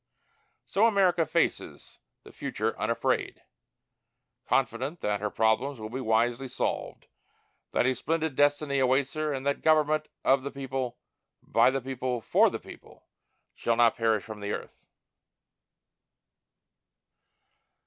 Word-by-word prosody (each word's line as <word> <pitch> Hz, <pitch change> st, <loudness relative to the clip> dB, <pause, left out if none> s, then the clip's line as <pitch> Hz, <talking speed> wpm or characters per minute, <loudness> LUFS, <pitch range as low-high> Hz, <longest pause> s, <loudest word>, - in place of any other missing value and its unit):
So 215 Hz, +4 st, +3 dB
America 185 Hz, -6 st, +3 dB
faces -, -, -2 dB, 0.2 s
the -, -, -14 dB
future -, -, -3 dB
unafraid, -, -, -1 dB, 1.0 s
confident 135 Hz, +8 st, 0 dB
that 105 Hz, -1 st, 0 dB
her 105 Hz, +1 st, -2 dB
problems 115 Hz, +5 st, +1 dB
will 110 Hz, 0 st, -7 dB
be 130 Hz, +2 st, -4 dB
wisely 120 Hz, +3 st, +1 dB
solved, 125 Hz, -, -3 dB, 0.7 s
that -, -, +2 dB
a 130 Hz, -, +3 dB
splendid 160 Hz, +3 st, -2 dB
destiny 145 Hz, 0 st, +2 dB
awaits 130 Hz, +1 st, +2 dB
her, 155 Hz, -1 st, -1 dB
and 135 Hz, -1 st, -4 dB
that 140 Hz, 0 st, 0 dB
"government 155 Hz, -1 st, +3 dB, 0.2 s
of 135 Hz, 0 st, +4 dB
the 140 Hz, -, -4 dB
people, 135 Hz, -3 st, -4 dB, 0.5 s
by -, -, +4 dB
the 135 Hz, +1 st, -1 dB
people, 130 Hz, -1 st, -3 dB
for 110 Hz, -, +3 dB
the -, -, -4 dB
people, -, -, -14 dB, 0.5 s
shall 115 Hz, -, 0 dB
not 120 Hz, -1 st, +4 dB
perish 115 Hz, -3 st, +1 dB
from 110 Hz, -1 st, -9 dB
the 100 Hz, 0 st, -4 dB
earth." -, -, -6 dB
130 Hz, 130 wpm, -28 LUFS, 115-145 Hz, 1.0 s, of